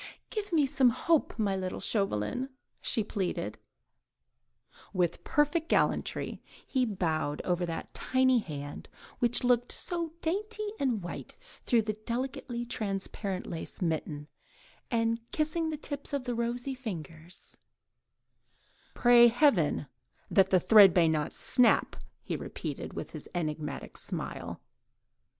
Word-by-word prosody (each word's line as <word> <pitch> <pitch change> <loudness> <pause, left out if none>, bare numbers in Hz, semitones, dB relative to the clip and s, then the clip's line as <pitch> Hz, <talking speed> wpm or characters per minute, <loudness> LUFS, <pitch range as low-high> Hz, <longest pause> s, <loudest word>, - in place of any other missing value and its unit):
"Give 415 -2 -3
me 310 -4 +4
some 270 -2 +4
hope, 320 +6 +1
my 205 -3 +1
little 185 -1 -3
Chauvelin," 200 - 0 0.3
she 225 - +3
pleaded. 200 -3 -3 1.3
With 180 -3 0
perfect 305 +3 +1
gallantry - - 0 0.2
he 260 -2 +1
bowed 160 -7 -1
over 175 -1 0
that 165 - -5
tiny 260 -1 +3
hand, 145 -7 -7 0.3
which 240 +1 +3
looked 245 -1 +3
so 335 -2 -4
dainty 425 +6 -2
and 245 -8 0
white 175 - -7 0.3
through 235 -3 +3
the 215 0 -1
delicately 240 +2 -4
transparent 195 -3 -3
black - - -8
lace - - -7
mitten, 155 -4 -2 0.6
and 230 -1 +1
kissing 320 +1 0
the 310 - -3
tips 285 -1 -5
of 280 -2 0
the 245 -1 -2
rosy 240 +3 -2
fingers:— 175 - -8 1.4
"Pray 240 -1 +7
heaven 225 - +3 0.5
that 190 -1 +5
the 185 - +5
thread 200 -1 +8
may 170 -2 +5
not 155 -2 0
snap," 245 -3 +3 0.3
he - - -3
repeated, - - -5
with - - -6
his - - -8
enigmatic 155 -3 -3
smile. - - -4
230 Hz, 125 wpm, -30 LUFS, 180-265 Hz, 1.4 s, thread